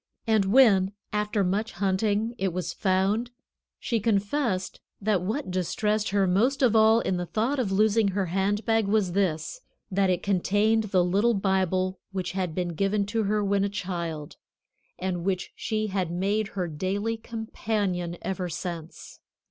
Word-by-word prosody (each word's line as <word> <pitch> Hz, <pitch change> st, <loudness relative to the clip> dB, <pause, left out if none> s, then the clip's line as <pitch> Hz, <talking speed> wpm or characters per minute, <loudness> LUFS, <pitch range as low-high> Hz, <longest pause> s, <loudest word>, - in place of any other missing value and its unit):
And 220 Hz, -4 st, +3 dB
when, 200 Hz, -4 st, +5 dB, 0.2 s
after 210 Hz, 0 st, 0 dB
much 205 Hz, +4 st, -1 dB
hunting, 205 Hz, +4 st, 0 dB
it 190 Hz, -1 st, 0 dB
was 180 Hz, +1 st, -3 dB
found, 195 Hz, +5 st, +1 dB, 0.5 s
she 230 Hz, -, -1 dB
confessed 205 Hz, -1 st, 0 dB, 0.2 s
that 205 Hz, -3 st, +1 dB
what 215 Hz, +4 st, -3 dB
distressed 210 Hz, +4 st, 0 dB
her 200 Hz, -1 st, +2 dB
most 230 Hz, +10 st, +2 dB
of 235 Hz, -3 st, +4 dB
all 220 Hz, +1 st, +6 dB
in 185 Hz, -, -1 dB
the 175 Hz, 0 st, -3 dB
thought 240 Hz, +9 st, 0 dB
of 220 Hz, -6 st, 0 dB
losing 215 Hz, +2 st, +3 dB
her 195 Hz, 0 st, 0 dB
hand 195 Hz, +4 st, 0 dB
bag 225 Hz, -2 st, +2 dB
was 200 Hz, -3 st, +2 dB
this, 185 Hz, -, -1 dB, 0.3 s
that 195 Hz, 0 st, +2 dB
it 180 Hz, -1 st, 0 dB
contained 205 Hz, +3 st, +2 dB
the 190 Hz, -3 st, +2 dB
little 205 Hz, +6 st, +2 dB
Bible 190 Hz, -1 st, 0 dB
which 185 Hz, -2 st, -3 dB
had 180 Hz, -4 st, -3 dB
been 180 Hz, -1 st, -1 dB
given 195 Hz, +4 st, 0 dB
to 220 Hz, +1 st, -1 dB
her 210 Hz, 0 st, +1 dB
when 200 Hz, 0 st, +2 dB
a 200 Hz, -, 0 dB
child 170 Hz, -6 st, -5 dB, 0.6 s
and 180 Hz, -2 st, -3 dB
which 185 Hz, -1 st, -2 dB
she 215 Hz, -1 st, -2 dB
had 190 Hz, -4 st, -1 dB
made 200 Hz, +5 st, 0 dB
her 180 Hz, -2 st, 0 dB
daily 195 Hz, +8 st, -2 dB
companion 210 Hz, -6 st, -3 dB
ever 185 Hz, -2 st, -3 dB
since. 170 Hz, -1 st, -7 dB
195 Hz, 160 wpm, -26 LUFS, 185-215 Hz, 0.6 s, all